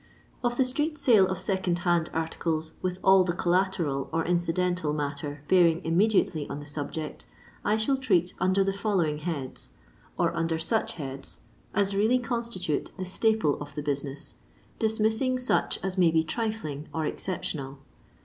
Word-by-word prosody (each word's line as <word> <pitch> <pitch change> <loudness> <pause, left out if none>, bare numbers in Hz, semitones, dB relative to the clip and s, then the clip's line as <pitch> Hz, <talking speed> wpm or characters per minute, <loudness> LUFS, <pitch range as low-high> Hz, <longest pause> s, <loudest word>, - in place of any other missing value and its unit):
Of 240 0 0
the 265 - +4
street 295 +4 -1
sale 225 -9 +5
of 190 -1 -3
second 185 -2 0
hand 175 -2 +2
articles, 160 -1 -2
with 180 0 -2
all 190 -1 +7
the 175 -1 -1
collateral 175 -6 0
or 165 0 0
incidental 175 -2 +1
matter 145 0 -4
bearing 170 -3 +5
im 165 +1 -1
mediately 190 -6 +2
on 140 - -4
the 145 - -9
subject, 150 +1 -5 0.4
I 210 +1 +2
shall 245 +5 +2
treat 180 -9 +2
under 185 +1 +3
the 195 0 0
following 190 -7 0
heads, 150 -5 -4 0.4
or - - +1
under 165 0 0
such 215 +8 0
heads 135 -3 -5 0.3
as 200 -1 +2
really 220 +5 +4
constitute 235 - -2
the 185 - -3
staple 190 -5 +2
of 145 0 -8
the 150 - -3
business, 140 -1 -3 0.4
dismissing 220 +3 +2
such 250 0 +1
as 190 0 -1
may 175 -2 +6
be 160 0 +3
trifling 160 -7 -3
or 160 -1 -2
exceptional. 145 -6 -3
180 Hz, 160 wpm, -28 LUFS, 155-210 Hz, 0.4 s, all